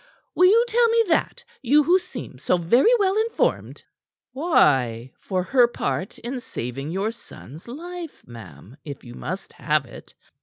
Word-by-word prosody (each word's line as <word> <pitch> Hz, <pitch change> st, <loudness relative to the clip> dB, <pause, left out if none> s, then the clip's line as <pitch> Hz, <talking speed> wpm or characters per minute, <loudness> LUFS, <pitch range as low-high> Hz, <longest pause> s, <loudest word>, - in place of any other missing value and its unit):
Will 365 Hz, -, +5 dB
you 460 Hz, +5 st, +5 dB
tell 475 Hz, 0 st, +3 dB
me 460 Hz, 0 st, +4 dB
that, 325 Hz, -, 0 dB, 0.2 s
you 285 Hz, +4 st, +4 dB
who 355 Hz, +5 st, +4 dB
seem 255 Hz, -, -9 dB
so 180 Hz, -, +1 dB
very 210 Hz, -, +3 dB
well 390 Hz, -2 st, +1 dB
informed." 450 Hz, +1 st, -1 dB, 0.5 s
"Why, 130 Hz, -, +2 dB
for 185 Hz, -2 st, -2 dB
her 245 Hz, +5 st, +4 dB
part 200 Hz, -5 st, -4 dB
in 250 Hz, +2 st, -5 dB
saving 135 Hz, -, -6 dB
your 195 Hz, +6 st, -1 dB
son's 165 Hz, -, -13 dB
life, 340 Hz, +5 st, -8 dB
ma'am, 110 Hz, -, -13 dB
if 140 Hz, -3 st, -8 dB
you 120 Hz, -, -11 dB
must 185 Hz, +9 st, -6 dB
have 150 Hz, -3 st, 0 dB
it. -, -, -14 dB
230 Hz, 155 wpm, -23 LUFS, -, 0.5 s, Will